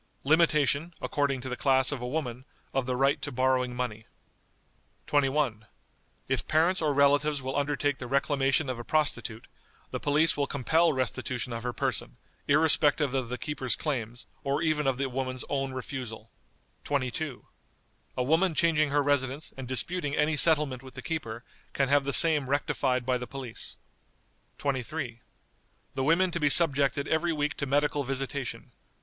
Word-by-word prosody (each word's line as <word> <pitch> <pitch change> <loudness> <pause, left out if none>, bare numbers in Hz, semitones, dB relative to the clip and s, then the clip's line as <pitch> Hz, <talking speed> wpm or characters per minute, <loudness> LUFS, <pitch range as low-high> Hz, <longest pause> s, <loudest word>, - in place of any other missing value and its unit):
Limitation, 155 +1 +2
according 140 -3 -1
to 130 - -6
the 125 - -3
class 130 0 +2
of 140 -4 -4
a 125 - -3
woman, 125 -3 -3 0.3
of 130 -2 -1
the 125 - 0
right 135 +2 +1
of - - -7
borrowing 130 -1 +1
money." 115 -3 -4 1.0
"21. 135 -6 0 0.6
If 130 -1 -1
parents 170 +4 +2
or 155 -2 +2
relatives 145 0 +3
will 130 +1 -3
undertake 145 -1 0
the 125 - -6
reclamation 140 +2 +1
of 130 -2 -3
a - - -5
prostitute, 130 -6 -1 0.5
the - - -3
police 150 +3 +3
will 145 -1 0
compel 160 +5 +2
restitution 130 -1 -3
of 115 - -4
her 125 +1 -2
person, - - -2 0.3
irrespective 150 -1 +4
of 130 -3 -1
the 125 - -3
keeper's 135 -4 -2
claims, 120 -5 -4 0.2
or 140 +3 0
even 155 -3 +1
of 130 -2 +1
the 135 0 -1
woman's 130 0 -4
own 135 -1 -1
refusal." 125 -4 -7 0.5
"22. 140 0 -2 0.7
A 125 - +1
woman 160 +5 +2
changing 160 -3 +3
her 145 +1 +2
residence, 140 +1 -1
and 130 -2 -7
disputing 145 +3 -1
any 155 +1 +2
settlement 150 -5 +3
with 130 -1 -13
the 130 - -8
keeper, 120 -9 -4 0.3
can 135 -1 +1
have 140 0 +3
the 140 - 0
same 150 -3 +5
rectified 130 -3 0
by 125 -1 +1
the 125 - -6
police." 130 -5 -8 0.8
"23. 130 -2 -3 0.7
The 135 - -2
women 170 +5 +3
to 170 - -2
be 150 -2 +3
subjected 140 -3 +3
every 165 +2 +1
week 150 -1 -1
to 140 - -2
medical 145 +1 +1
visitation. 135 0 -4
140 Hz, 160 wpm, -28 LUFS, 130-150 Hz, 1.0 s, same